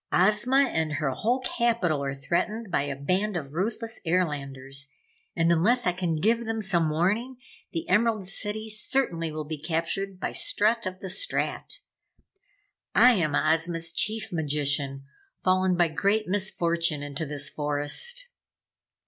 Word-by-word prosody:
Ozma 215 +8 +4
and 160 - -1
her 145 -3 0
whole 240 - 0
capitol 230 - 0
are 135 -1 -2
threatened 195 +9 -2
by - - +2
a 140 -1 -3
band 185 +8 0
of 140 -4 -6
ruthless 225 +6 -2
Airlanders, 140 -6 -2 0.5
and 165 0 +3
unless 215 +10 +3
I 180 - +3
can 175 -2 -2
give 225 +8 +2
them 225 0 -2
some 175 -6 +2
warning, 210 +11 0 0.3
the 165 - -4
Emerald 215 +1 +2
City 210 +3 -4
certainly 210 -6 -1
will 155 0 -5
be 155 0 -5
captured 180 +4 -2
by - - -2
Strut 220 +1 +1
of 185 0 -6
the 190 - -5
Strat. - - -2 1.1
I 250 - +8
am 170 -10 +1
Ozma's 165 +2 +1
Chief 215 +2 0
Magician, 145 -3 -1 0.3
fallen 185 -1 +2
by 175 -1 +4
great 200 +7 +1
misfortune 170 -5 +1
into 145 +2 -4
this 145 0 -1
forest." 150 - 0
180 Hz, 140 wpm, -27 LUFS, 155-215 Hz, 1.1 s, I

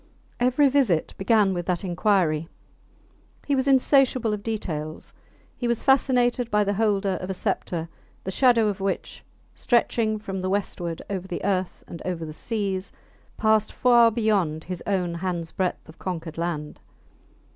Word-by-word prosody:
Every 255 +4 +4
visit 255 - +2
began 200 -1 +3
with 175 -1 -4
that 180 0 -1
inquiry; 175 -4 +1 1.0
he 285 - 0
was 260 +1 0
insatiable 265 -4 +3
of 210 - -3
details; 160 -9 -5 0.4
he 245 - -3
was 235 -1 0
fascinated 250 -3 +3
by 210 -1 +3
the 200 0 0
holder 200 -3 +1
of 185 - -5
a 190 - -2
sceptre 170 -2 -2 0.4
the 190 - -3
shadow 235 0 +4
of 200 -2 -2
which, 195 0 -3 0.3
stretching 230 -2 +1
from 195 -2 -5
the 185 - -2
westward 175 -4 -3
over 190 -2 -4
the 175 - -5
earth 190 -2 -1
and 170 - -9
over 175 -3 -3
the 155 - -7
seas, 195 -1 -3 0.5
passed 220 -1 +2
far 240 -2 +5
beyond 205 -9 0
his 180 -1 -6
own 185 -4 0
hands 170 -1 -3
breadth 185 -2 -2
of 160 - -15
conquered 165 -3 -5
land. 155 -3 -3
195 Hz, 155 wpm, -25 LUFS, 175-230 Hz, 1.0 s, far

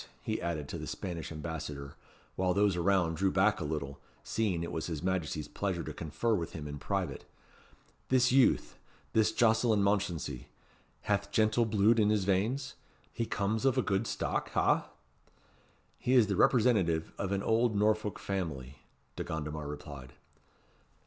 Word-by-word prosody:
he - - -2
added 80 -4 -3
to - - -5
the - - -6
Spanish 85 -5 -5
Ambassador, 75 -3 -6 0.4
while 90 -1 +1
those 100 -2 +3
around 90 -2 +2
drew 95 +2 +2
back 95 +2 +3
a - - -3
little, 75 -2 -4 0.2
seeing 95 -7 -1
it 85 - -4
was 80 - -3
his 80 -2 -4
Majesty's 85 -5 -1
pleasure 95 -2 -2
to - - -6
confer 85 +9 -1
with 85 -6 -2
him 75 -2 -6
in 75 0 -6
private, - - -2 0.9
"this 125 -1 +4
youth 135 0 +3 0.3
this 110 -1 +3
Jocelyn 110 -2 +3
Mounchensey, 95 -10 -1 0.5
hath 100 -1 0
gentle 110 +3 +3
bluid 110 +1 +3
in 105 -1 +4
his 105 -2 +2
veins? 105 +8 0 0.4
he 115 - -2
comes 105 +1 -1
of 135 -1 +3
a 130 - +3
good 100 +3 0
stock, - - -2
ha?" - - +2 1.1
"He 125 - 0
is 120 -4 +7
the 100 -1 -1
representative 95 -10 +3
of 100 - -2
an 100 0 0
old 115 0 +2
Norfolk 105 0 +1
family," 75 -9 -4 0.4
De - - -2
Gondomar 75 -1 -4
replied. 70 -3 -8
95 Hz, 155 wpm, -31 LUFS, 80-110 Hz, 1.1 s, is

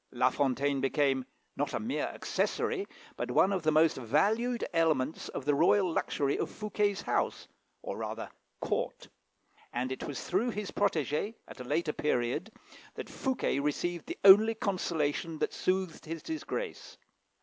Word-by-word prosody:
La 125 +1 +3
Fontaine 140 0 +1
became, 135 -1 +1 0.3
not 145 0 -1
a - - 0
mere 230 +4 -1
accessory, 405 -3 -1 0.3
but - - -3
one 195 - +4
of 190 - 0
the 155 0 +2
most 155 +1 +4
valued 220 - +1
elements 160 -3 +1
of 130 - -5
the 145 - +3
royal 175 +4 +4
luxury 140 -3 0
of - - -1
Fouquet's 210 -1 -1
house, - - -1 0.4
or, - - -4
rather, - - -4 0.3
court; - - -2 0.6
and 125 +2 -2
it 130 - -4
was 145 - -5
through 205 +7 +1
his 210 -3 -4
protégé, 155 - 0
at - - -11
a - - -5
later 150 +4 0
period, 150 - -1 0.4
that - - -7
Fouquet 260 - -1
received 165 +4 -2
the 345 - -5
only 210 +3 +8
consolation 165 -6 -1
that - - -1
soothed 185 -3 -1
his 165 0 -6
disgrace. 420 +9 -5
165 Hz, 150 wpm, -31 LUFS, 140-205 Hz, 0.6 s, only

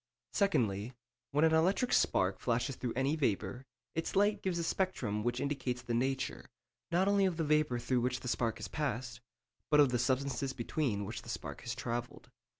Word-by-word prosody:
Secondly, 115 - +1 0.4
when 150 +3 +3
an 160 - +4
electric 190 +10 +3
spark 95 0 +3
flashes 120 +2 0
through 125 -2 -3
any 135 +4 +1
vapour, 125 -2 -1 0.3
its 165 +4 -2
light 205 +2 +3
gives 185 -2 -1
a 170 - -1
spectrum 135 - -1
which 120 +1 0
indicates 130 -3 -2
the 120 -1 -3
nature, 130 +3 -1 0.4
not 180 +3 +3
only 200 -1 +4
of 175 -3 -2
the 165 - 0
vapour 150 -4 +2
through 120 +1 0
which 125 +1 -1
the - - -6
spark 115 -2 0
has - - -5
passed, 120 -5 -3 0.5
but 150 - +5
of 145 -3 +7
the 125 -1 0
substances 135 +1 0
between 115 -4 -1
which - - -5
the - - -12
spark - - -5
has 115 -1 -4
travelled. 120 -1 -4
130 Hz, 185 wpm, -33 LUFS, 120-160 Hz, 0.5 s, of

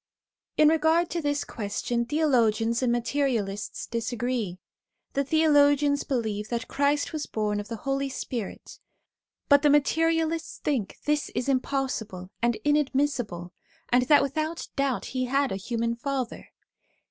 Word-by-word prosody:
In 305 - +6
regard 320 +2 +2
to 340 - -1
this 290 -1 0
question, 235 +2 -2
theologians 235 -6 +2
and 250 -2 +2
materialists 235 -5 -1
disagree. 235 -4 -2 0.6
The 280 - +1
theologians 290 -1 +4
believe 215 -5 -2
that 235 -1 -3
Christ 285 +2 0
was 310 -1 -3
born 210 -1 -1
of 205 - -6
the 230 - -4
Holy 275 0 0
Spirit; 240 -5 -6 0.7
but 285 -1 +6
the 295 - +4
materialists 325 +2 +1
think 255 -10 -2
this 300 0 +1
is 250 - -1
impossible 255 -8 -2
and 235 0 +2
inadmissible, 270 - 0 0.4
and 250 0 +3
that 290 0 +6
without 310 +4 -3
doubt 275 -3 0
he 255 -1 -2
had 275 +2 +1
a - - -1
human 230 +4 -2
father. 260 0 -4
265 Hz, 135 wpm, -27 LUFS, 230-290 Hz, 0.7 s, In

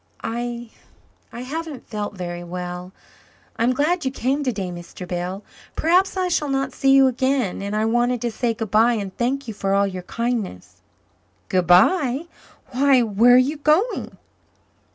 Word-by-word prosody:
"I 240 0 -4 0.6
I 240 - -7
haven't 295 +1 -6
felt 210 -2 -4
very 175 -1 -5
well. 180 +1 -6 0.7
I'm 235 +2 +2
glad 310 +7 +1
you 265 - 0
came 265 +3 -1
today, 205 -9 -2
Mr. 175 +1 -9
Bell. 180 +3 -4 0.3
Perhaps 365 +4 +2
I 370 -1 +1
shall 305 -4 0
not 270 -1 -1
see 270 - +1
you 270 0 +7
again, 260 -5 0
and 200 +1 -3
I 215 +1 +1
wanted 240 +2 +1
to 240 - -1
say 230 +1 -1
goodbye 225 +2 +2
and 200 -4 -4
thank 260 +2 -1
you 220 - -4
for 195 -1 -1
all 200 0 +3
your 185 -2 -4
kindness." 180 - -4 0.7
"Goodbye? 245 - +3 0.5
Why, 265 -1 +4
where 230 +3 +5
are - - +8
you 275 +5 +2
going?" 310 +11 +1
240 Hz, 155 wpm, -22 LUFS, 195-270 Hz, 0.7 s, are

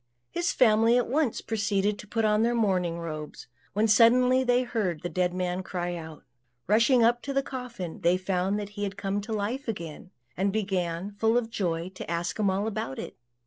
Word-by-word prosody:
His 345 0 0
family 230 0 +4
at 245 - +1
once 275 -2 0
proceeded 205 -2 0
to 210 - -10
put 225 +1 0
on 210 0 +3
their 235 +1 +2
mourning 185 -6 +1
robes, 155 -3 -6 0.3
when 210 +3 +2
suddenly 250 +4 +5
they 245 0 +3
heard 205 -10 -2
the 175 - -2
dead 180 -1 0
man 180 0 -2
cry 175 -1 -3
out. 160 -2 -9 0.4
Rushing 230 +4 +4
up 240 +1 +3
to 280 - -4
the 275 0 +1
coffin, 240 -11 -6
they 175 +1 +3
found 185 +2 -1
that 205 -1 -5
he 205 0 -8
had 200 -1 -3
come 200 0 -2
to 220 +3 -8
life 220 +6 -2
again; 170 -5 -6 0.3
and 195 +2 +1
began, 190 -3 -2
full 225 +3 +2
of 230 -2 -1
joy, 170 -4 -2
to 190 -2 -9
ask 170 +3 -2
him 205 -2 +3
all 195 +2 0
about 195 -11 -3
it. - - -6
205 Hz, 200 wpm, -27 LUFS, 180-230 Hz, 0.4 s, suddenly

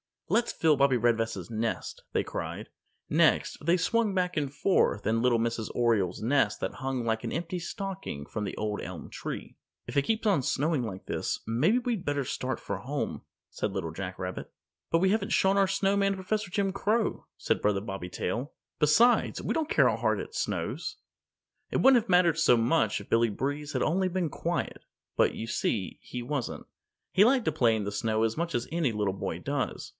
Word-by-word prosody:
"Let's 235 - +2
fill 155 -3 +3
Bobbie 135 -1 +4
Redvest's 115 -5 0
nest," 110 0 -3
they - - +2
cried. - - -5 0.4
Next, - - +3
they 170 +3 +4
swung 210 +3 +1
back 180 -2 0
and 145 -3 0
forth 140 - +2
in 115 +1 +2
little 125 -1 +3
Mrs. 115 -1 -1
Oriole's 110 -7 +1
nest 120 -4 +2
that - - -2
hung 135 -3 -2
like 110 -1 -1
an - - -3
empty 170 +3 -3
stocking 190 - -5
from 105 +6 -4
the - - -4
Old 105 -1 -2
Elm - - -7
Tree. - - -6 0.3
"If 125 +4 -4
it 140 - +4
keeps 225 +7 -1
on 195 -9 +3
snowing 145 +2 0
like 95 -5 -6
this, - - -2
maybe 150 - +2
we'd 240 -6 -2
better 145 -1 0
start 130 +1 -3
for 100 - -3
home," 125 - -4 0.3
said 100 - -3
Little 85 -5 -3
Jack 90 +2 -6
Rabbit. 90 0 -5 0.4
"But 165 - +3
we 190 +2 +3
haven't 205 0 0
shown 195 +1 +3
our 195 -1 +4
Snowman 195 +1 +2
to 190 - -7
Professor 210 +2 -2
Jim 195 +1 0
Crow," 215 +3 0
said - - 0
Brother 105 -2 +2
Bobby 95 -4 -5
Tail. 120 - -3 0.3
"Besides, 210 +12 +4
we - - -1
don't 320 -1 -1
care - - +5
how - - -1
hard - - +1
it - - -9
snows." - - -2 0.8
It - - +1
wouldn't 265 -2 +7
have 215 - -17
mattered 175 -3 +4
so 125 - +6
much 115 -2 +2
if 100 - -14
Billy 115 0 +3
Breeze 145 +7 -3
had - - +1
only 185 +4 +2
been 180 -2 -1
quiet. - - -3 0.4
But, - - +3
you 115 - -4
see, 105 -3 -2
he 125 -1 -6
wasn't. 135 0 -3 0.5
He 200 - +6
liked 250 0 +3
to - - +2
play 120 -7 +3
in 110 - -2
the 100 - -3
snow 110 +1 0
as 115 +3 0
much 170 +1 -2
as 120 - 0
any 160 -8 +1
little 105 -2 0
boy 95 - -4
does. - - -3
140 Hz, 200 wpm, -29 LUFS, 110-185 Hz, 0.8 s, wouldn't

